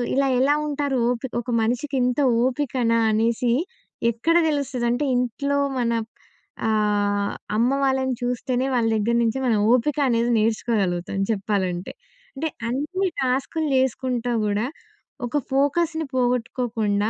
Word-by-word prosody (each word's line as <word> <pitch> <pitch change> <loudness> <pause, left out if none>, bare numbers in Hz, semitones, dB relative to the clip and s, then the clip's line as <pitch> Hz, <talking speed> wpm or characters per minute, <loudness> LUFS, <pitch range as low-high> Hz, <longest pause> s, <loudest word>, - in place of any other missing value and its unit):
ఇలా 275 0 +2
ఎలా 290 +2 +4
ఉంటారు, 285 -2 -1
ఓపి 250 +2 -2
ఒక 245 - -10
మనిషికి 250 +5 -1
ఇంత 250 +3 0 0.3
ఓపికనా 250 -3 +1
అనేసి 235 +2 +1 0.6
ఎక్కడ 320 +9 +1 0.2
తెలుస్తదంటే, 260 -2 -1
ఇంట్లో 280 +4 0 0.2
మన 235 -1 +1 0.8
ఆహ్, 205 -2 +1 0.2
అమ్మ 235 +3 +3
వాళ్ళని 265 -1 +1
చూస్తేనే, 250 +1 -1
వాళ్ళ 235 -2 +2
దగ్గర 220 +2 +1
నుంచె 230 +3 0
మనం 225 -3 +2
ఓపిక 270 +5 +2
అనేది 235 0 +1
నేర్చుకోగలుగుతాం, 210 -5 0
చెప్పాలంటే. 195 -3 -2 0.4
అంటే 315 +4 -2 0.2
అన్ని 305 +10 -1
టాస్క్‌లు 265 +5 0
జేసుకుంటా 255 -2 0
గూడా, 210 +3 0 0.6
ఒక 245 +5 -1
ఫోకస్‌ని 315 +4 +1
పోగొట్టుకోకుండా 230 -4 0
245 Hz, 115 wpm, -23 LUFS, 225-270 Hz, 0.8 s, ఎలా